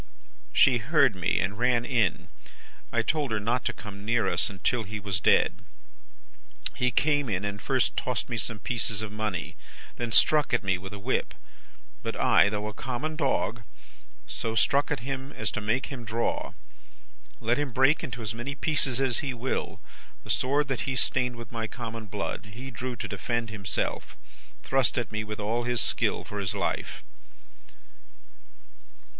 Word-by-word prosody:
"'She 130 -3 +6
heard 135 - +4
me, 90 -1 +1
and 100 +2 -1
ran 120 -1 +3
in. 115 - +1 0.6
I 115 -1 +2
told 150 +1 0
her 110 -1 0
not 115 +4 0
to - - +2
come 105 -7 -9
near 115 +2 +2
us - - +4
till 120 +6 +2
he 110 0 -5
was 100 -3 -1
dead. - - +3 1.1
He 125 - +1
came 145 +1 +2
in 100 -1 -1
and 100 0 -3
first 130 -4 +1
tossed 125 -3 -1
me 120 - -3
some 110 +1 -2
pieces 110 -1 -2
of 110 - -5
money; 105 -5 -3 0.4
then 120 -1 -2
struck 150 +3 +5
at 120 - -1
me 95 -1 +1
with 95 +1 -8
a 105 - -6
whip. 100 - -1 0.7
But - - -3
I, - - +5
though 105 0 -2
a 105 - -5
common 135 +7 -3
dog, 135 -5 0 0.6
so 115 0 -3
struck 140 +4 +3
at 145 -5 -1
him 135 +2 -4
as - - -2
to 110 - -3
make 115 +7 0
him 130 -4 -6
draw. 115 +1 -1 0.9
Let 120 +4 +1
him 145 -3 -1
break 130 +7 +4
into 125 -6 -5
as 110 - -3
many 120 +5 -4
pieces 135 -3 +1
as 130 -3 +1
he 130 -3 -2
will, 125 +2 -2 0.4
the - - -2
sword 140 +3 +2
that 135 0 -1
he 130 - 0
stained 125 -1 +1
with 115 -2 -9
my 115 -1 -2
common 115 -2 -6
blood; 100 0 -4
he 130 +4 -7
drew 125 +1 -4
to - - -4
defend 115 +2 -2
himself 100 -3 -3 0.5
thrust 135 -2 +2
at 120 -4 -1
me 110 0 -2
with 105 0 -6
all 115 +3 0
his 120 -1 +1
skill - - +1
for 105 - -5
his 95 0 -1
life. 100 - -2
120 Hz, 175 wpm, -28 LUFS, 105-130 Hz, 1.1 s, She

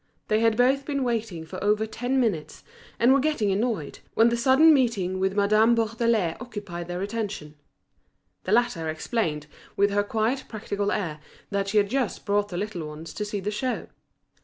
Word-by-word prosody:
They 215 - +3
had 225 -1 +2
both 265 +3 +3
been 280 -2 -2
waiting 225 -9 -2
for 160 - -7
over 210 +1 +2
ten 245 +4 -1
minutes, 205 -11 -1 0.3
and 240 +3 +5
were 275 - +4
getting 265 -8 +1
annoyed, 205 - -2 0.2
when 230 +1 +5
the 235 - 0
sudden 265 +7 +6
meeting 210 -9 +1
with 190 +1 0
Madame 215 +3 +4
Bourdelais 225 -5 +1
occupied 205 -8 -7
their 175 +1 -3
attention. 205 -8 -4 0.9
The 185 - -2
latter 215 -9 +2
explained, 155 - -2 0.3
with 200 +1 +3
her 205 0 +2
quiet 220 +5 -1
practical 205 -2 -3
air, 165 -7 -2 0.3
that 200 0 -1
she 205 +2 0
had 205 0 +3
just 260 -4 -1
brought 205 0 +1
the 175 - -5
little 190 -5 -4
ones 155 +2 -9
to 210 - -3
see 205 0 -3
the 205 +2 -2
show. 250 +4 -3
210 Hz, 180 wpm, -26 LUFS, 190-235 Hz, 0.9 s, sudden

